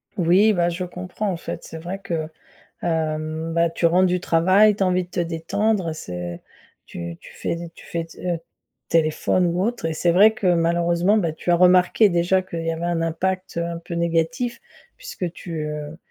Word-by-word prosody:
Oui 190 Hz, +5 st, +4 dB
bah 175 Hz, -2 st, +2 dB
je 175 Hz, +2 st, -3 dB
comprends 180 Hz, +3 st, -4 dB
en 175 Hz, -, -3 dB
fait, -, -, -6 dB
c'est 165 Hz, -, -8 dB
vrai 175 Hz, +4 st, -6 dB
que 165 Hz, -5 st, -3 dB, 0.6 s
hem, 160 Hz, -1 st, -2 dB
bah 170 Hz, 0 st, +3 dB
tu 170 Hz, -, +1 dB
rentres 180 Hz, +3 st, +4 dB
du 180 Hz, 0 st, 0 dB
travail, 190 Hz, +6 st, +4 dB
tu 195 Hz, -, -1 dB
as -, -, +4 dB
envie 185 Hz, 0 st, +1 dB
de -, -, -19 dB
te 175 Hz, -, -3 dB
détendre, 175 Hz, +4 st, 0 dB
heu, -, -, -3 dB
c'est 90 Hz, -, -6 dB, 0.4 s
tu 85 Hz, -1 st, -7 dB
tu -, -, -13 dB
fais -, -, -2 dB
d 170 Hz, 0 st, -7 dB
tu -, -, -15 dB
fais, 165 Hz, -1 st, -3 dB
heu, 175 Hz, -2 st, -2 dB, 0.5 s
téléphone 165 Hz, +2 st, +2 dB
ou 175 Hz, +2 st, 0 dB
autre 235 Hz, -5 st, -1 dB
et 160 Hz, -, -1 dB
c'est 170 Hz, +2 st, +2 dB
vrai 205 Hz, +5 st, +6 dB
que 200 Hz, -, -3 dB
malheureusement, 170 Hz, +3 st, +2 dB
bah 165 Hz, -5 st, 0 dB
tu 165 Hz, -, -3 dB
as 175 Hz, -, +6 dB
remarqué 180 Hz, +4 st, +5 dB
déjà 175 Hz, +2 st, +2 dB
qu'il 170 Hz, -3 st, -6 dB
y 165 Hz, -, 0 dB
avait 165 Hz, +1 st, -4 dB
un 175 Hz, -1 st, 0 dB
impact, 185 Hz, +3 st, -2 dB
heu, 170 Hz, -, 0 dB
un 170 Hz, 0 st, -4 dB
peu 170 Hz, +1 st, -7 dB
négatif 170 Hz, +8 st, -1 dB, 0.4 s
puisque 485 Hz, -, -5 dB
tu, 165 Hz, -4 st, -6 dB
heu, 150 Hz, +1 st, -6 dB
170 Hz, 205 wpm, -22 LUFS, 165-185 Hz, 0.6 s, vrai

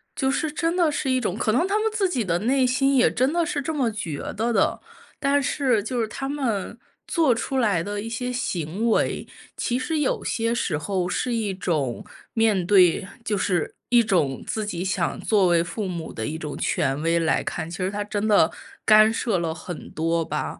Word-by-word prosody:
就 265 Hz, -1 st, 0 dB
是 295 Hz, +3 st, 0 dB
真 330 Hz, +2 st, -1 dB
的 340 Hz, -4 st, +3 dB
是 270 Hz, -, -2 dB
一 255 Hz, 0 st, +2 dB
种 200 Hz, -5 st, -2 dB
可 215 Hz, -, 0 dB
能 335 Hz, -, +2 dB
他 415 Hz, +2 st, +1 dB
们 440 Hz, 0 st, 0 dB
自 415 Hz, -3 st, +1 dB
己 255 Hz, -10 st, -1 dB
的 170 Hz, -2 st, 0 dB
内 255 Hz, +3 st, +2 dB
心 270 Hz, +2 st, +2 dB
也 250 Hz, -, +4 dB
真 260 Hz, +4 st, +1 dB
的 345 Hz, 0 st, +2 dB
是 305 Hz, -5 st, -2 dB
这 320 Hz, -, -2 dB
么 260 Hz, -6 st, +1 dB
觉 165 Hz, -9 st, -4 dB, 0.2 s
得 230 Hz, +1 st, 0 dB
的。 -, -, +2 dB, 0.4 s
但 280 Hz, 0 st, +2 dB
是 260 Hz, -6 st, +1 dB
就 240 Hz, +3 st, -3 dB
是 225 Hz, -, 0 dB
他 270 Hz, +4 st, -5 dB
们 235 Hz, -6 st, -2 dB, 0.3 s
做 320 Hz, -7 st, +3 dB
出 265 Hz, +3 st, -2 dB
来 205 Hz, -9 st, +2 dB
的 205 Hz, +2 st, -4 dB
一 225 Hz, -, -6 dB
些 250 Hz, +2 st, -3 dB
行 195 Hz, -2 st, -2 dB
为， -, -, 0 dB, 0.3 s
其 245 Hz, +1 st, -1 dB
实 315 Hz, +5 st, -2 dB
有 285 Hz, -, 0 dB
些 230 Hz, 0 st, 0 dB
时 175 Hz, -9 st, -1 dB
候 180 Hz, +3 st, -2 dB
是 245 Hz, +6 st, -1 dB
一 220 Hz, -4 st, -1 dB
种 155 Hz, -10 st, -2 dB, 0.3 s
面 215 Hz, -6 st, +2 dB
对 185 Hz, -1 st, +5 dB, 0.2 s
就 210 Hz, -2 st, -1 dB
是 180 Hz, -4 st, 0 dB
一 240 Hz, -1 st, +5 dB
种 165 Hz, -, 0 dB
自 215 Hz, -1 st, -2 dB
己 180 Hz, -4 st, -3 dB
想 185 Hz, -2 st, -1 dB
作 205 Hz, -4 st, +3 dB
为 170 Hz, -1 st, +3 dB
父 200 Hz, +3 st, -4 dB
母 170 Hz, -3 st, -5 dB
的 110 Hz, -, -4 dB
一 160 Hz, -, -4 dB
种 150 Hz, -2 st, -6 dB
权 135 Hz, +2 st, 0 dB
威 165 Hz, +1 st, +2 dB
来 165 Hz, -1 st, +2 dB
看， 165 Hz, 0 st, -4 dB
其 175 Hz, -, -6 dB
实 185 Hz, 0 st, -1 dB
他 205 Hz, +1 st, -3 dB
真 210 Hz, +1 st, -2 dB
的 200 Hz, -6 st, +4 dB, 0.3 s
干 215 Hz, +1 st, +6 dB
涉 225 Hz, -5 st, 0 dB
了 165 Hz, -1 st, -2 dB
很 175 Hz, +1 st, -8 dB
多 165 Hz, +1 st, 0 dB
吧。 -, -, -4 dB
215 Hz, 230 characters per minute, -24 LUFS, 175-255 Hz, 0.4 s, 干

